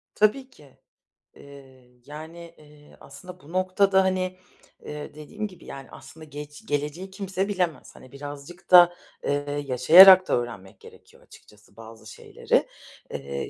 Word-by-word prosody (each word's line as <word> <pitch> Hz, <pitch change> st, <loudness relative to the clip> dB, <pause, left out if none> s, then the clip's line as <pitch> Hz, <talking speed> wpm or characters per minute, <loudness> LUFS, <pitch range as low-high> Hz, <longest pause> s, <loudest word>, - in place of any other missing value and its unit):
Tabii 245 Hz, +6 st, +1 dB
ki. 140 Hz, -3 st, -21 dB, 0.6 s
Eee, 135 Hz, -3 st, -17 dB
yani, 165 Hz, +3 st, -11 dB
eee, 150 Hz, -1 st, -20 dB
aslında 180 Hz, +6 st, -13 dB
bu 155 Hz, -2 st, -17 dB
noktada, 190 Hz, +1 st, +2 dB
hani, 185 Hz, -1 st, -2 dB, 0.5 s
eee, 150 Hz, -1 st, -8 dB
dediğim 155 Hz, +8 st, -7 dB
gibi, 185 Hz, -4 st, -17 dB
yani, 135 Hz, -1 st, -10 dB
aslında 160 Hz, -, -14 dB
gec 150 Hz, 0 st, -11 dB
geleceği 150 Hz, +6 st, -4 dB
kimse 190 Hz, 0 st, -4 dB
bilemez. 180 Hz, -6 st, -3 dB
Hani, 130 Hz, -, -16 dB
birazcık 145 Hz, +6 st, -11 dB
da, 175 Hz, -1 st, +8 dB, 0.3 s
eee, 145 Hz, 0 st, -3 dB
yaşayarak 185 Hz, +9 st, +8 dB
da -, -, -1 dB
öğrenmek 115 Hz, -6 st, -7 dB
gerekiyor -, -, -18 dB
açıkçası 105 Hz, 0 st, -20 dB
bazı 115 Hz, 0 st, -14 dB
şeyleri. -, -, -2 dB, 0.4 s
Eee, 70 Hz, 0 st, -6 dB
150 Hz, 135 wpm, -24 LUFS, 140-185 Hz, 0.6 s, da